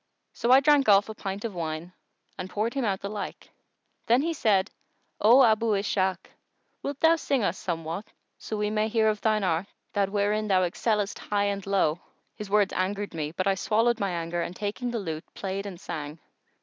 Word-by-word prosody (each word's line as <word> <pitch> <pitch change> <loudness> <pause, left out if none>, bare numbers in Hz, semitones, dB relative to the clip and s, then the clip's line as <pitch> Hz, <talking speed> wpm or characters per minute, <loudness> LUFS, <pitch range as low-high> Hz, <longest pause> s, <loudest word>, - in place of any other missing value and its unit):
So 235 +1 0
I 265 +1 +8
drank 285 -4 +4
off 200 +1 +5
a - - -4
pint 200 0 -5
of 225 - -3
wine 165 0 -4 0.4
and 185 -1 -6
poured 215 +5 -1
him 275 - -1
out 195 -4 -1
the 200 - -4
like. 210 -1 -6 0.6
Then 275 +8 +3
said 205 -10 +2
he, - - -37 0.5
"O 240 +6 +7
Abu 220 -2 +3
Ishak, 190 -2 0 0.5
wilt 280 0 -4
thou 325 +1 +6
sing 275 -6 0
us 185 - 0
somewhat, 165 +3 -4 0.3
so 215 - -5
we 210 0 -1
may 215 0 +1
hear 220 0 +2
of 210 -1 -2
thine 215 -2 +2
art 180 +1 0 0.3
that 200 -2 +1
wherein 210 +1 +1
thou 185 -2 +3
excellest 205 +3 -1
high 205 -1 0
and 200 -1 -2
low?" 180 -5 +2 0.4
His 210 -2 -7
words 205 -1 +3
angered 200 +2 -2
me; 155 -2 -3
but 185 - -2
I 195 - +3
swallowed 225 +4 +1
my 200 - 0
anger 170 0 -2
and 175 - -4
taking 210 +5 -3
the 235 - -2
lute 160 -6 -5
played 195 +1 -4
and 185 -3 -8
sang. 155 -4 -6
205 Hz, 200 wpm, -27 LUFS, 185-220 Hz, 0.6 s, I